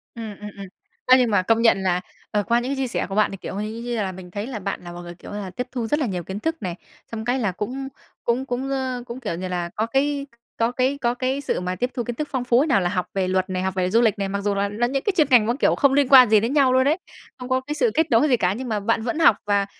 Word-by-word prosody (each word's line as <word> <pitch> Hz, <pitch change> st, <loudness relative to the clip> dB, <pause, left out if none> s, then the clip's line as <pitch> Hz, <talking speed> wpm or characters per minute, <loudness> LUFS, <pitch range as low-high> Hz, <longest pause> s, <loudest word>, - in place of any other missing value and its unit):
Ừm, 220 Hz, -3 st, -7 dB
ừm, 210 Hz, 0 st, -7 dB
ừm. 200 Hz, -, -7 dB, 0.4 s
Á, 255 Hz, 0 st, +7 dB
nhưng 245 Hz, -3 st, +2 dB
mà 200 Hz, -3 st, +4 dB
công 225 Hz, +4 st, +2 dB
nhận 230 Hz, -4 st, +5 dB
là, 180 Hz, -1 st, +1 dB, 0.3 s
ờ, 210 Hz, -1 st, +1 dB
qua 235 Hz, +3 st, +2 dB
những 250 Hz, +3 st, -3 dB
cái -, -, -1 dB
chia 265 Hz, -1 st, -1 dB
sẻ 240 Hz, -, -2 dB
của 195 Hz, -, -4 dB
bạn, 215 Hz, 0 st, +3 dB
thì, 195 Hz, -, -6 dB
kiểu, 185 Hz, -, -7 dB
như 215 Hz, +2 st, -4 dB
như 240 Hz, 0 st, -3 dB
là 200 Hz, -3 st, -1 dB
mình 180 Hz, -1 st, -11 dB
thấy 205 Hz, +4 st, -4 dB
là 250 Hz, -5 st, -5 dB
bạn 195 Hz, 0 st, -4 dB
là 175 Hz, -, -8 dB
một 175 Hz, 0 st, -8 dB
người, 175 Hz, 0 st, -9 dB
kiểu -, -, -12 dB
là, 205 Hz, -2 st, -5 dB
tiếp 250 Hz, -, -3 dB
thu 240 Hz, -3 st, -3 dB
rất 295 Hz, +7 st, +1 dB
là 290 Hz, -, +1 dB
nhiều 185 Hz, -6 st, -3 dB
kiến 190 Hz, +4 st, -6 dB
thức 320 Hz, +8 st, -1 dB
này. 180 Hz, -3 st, -3 dB, 0.4 s
Xong 220 Hz, -1 st, -5 dB
cái 245 Hz, +3 st, +1 dB
là 215 Hz, -6 st, 0 dB
cũng 250 Hz, +9 st, -4 dB, 0.4 s
cũng 245 Hz, +3 st, 0 dB
cũng, 260 Hz, +1 st, -3 dB
ơ, 260 Hz, -2 st, -2 dB
cũng, 240 Hz, +1 st, -7 dB
kiểu 205 Hz, -, -3 dB
như 185 Hz, +2 st, -4 dB
là, 175 Hz, -1 st, -3 dB
có 220 Hz, -, 0 dB
cái 280 Hz, +4 st, 0 dB, 0.3 s
có 230 Hz, +1 st, +1 dB
cái 260 Hz, +3 st, 0 dB
có 240 Hz, -1 st, +1 dB
cái 255 Hz, +2 st, -2 dB
sự 285 Hz, -, -1 dB
mà 180 Hz, 0 st, -3 dB
tiếp 245 Hz, +6 st, -1 dB
thu 240 Hz, -, -2 dB
kiến 240 Hz, +1 st, -4 dB
thức 300 Hz, +4 st, -3 dB
phong 260 Hz, -3 st, -1 dB
phú 245 Hz, 0 st, +3 dB
ấy. 305 Hz, -, +1 dB
Nào 245 Hz, -10 st, +3 dB
là 175 Hz, -, 0 dB
học 180 Hz, -1 st, -1 dB
về 190 Hz, -2 st, 0 dB
luật 185 Hz, +1 st, 0 dB
này, 185 Hz, 0 st, -2 dB
học 190 Hz, 0 st, -1 dB
về 185 Hz, -1 st, 0 dB
du 230 Hz, +3 st, +4 dB
lịch 220 Hz, -3 st, +2 dB
này, 195 Hz, -, -1 dB
mặc 200 Hz, +1 st, -2 dB
dù 200 Hz, 0 st, 0 dB
là 200 Hz, 0 st, 0 dB
là 225 Hz, +4 st, 0 dB
những 270 Hz, +2 st, -2 dB
cái 410 Hz, -, +1 dB
chuyên 310 Hz, -4 st, +4 dB
ngành 245 Hz, -5 st, +6 dB
mà, 235 Hz, -, +1 dB
kiểu, -, -, +3 dB
không 280 Hz, -1 st, +3 dB
liên 280 Hz, -1 st, +3 dB
quan 255 Hz, -4 st, +9 dB
gì 215 Hz, -1 st, +6 dB
đến 230 Hz, +6 st, -1 dB
nhau 275 Hz, -3 st, +4 dB
luôn 260 Hz, +1 st, +4 dB
ấy, 305 Hz, +3 st, +3 dB, 0.4 s
không 250 Hz, 0 st, -7 dB
có 260 Hz, 0 st, +1 dB
cái 290 Hz, +3 st, -5 dB
sự 465 Hz, +7 st, +2 dB
kết 320 Hz, 0 st, +1 dB
nối 235 Hz, +6 st, +5 dB
gì 250 Hz, -, +4 dB
cả, 185 Hz, -3 st, +1 dB
nhưng 250 Hz, +4 st, -5 dB
mà 215 Hz, -2 st, 0 dB
bạn 225 Hz, +2 st, 0 dB
vẫn 250 Hz, +7 st, -2 dB
học. 325 Hz, -10 st, +6 dB
Và, 200 Hz, -1 st, +2 dB
230 Hz, 325 wpm, -23 LUFS, 200-260 Hz, 0.4 s, quan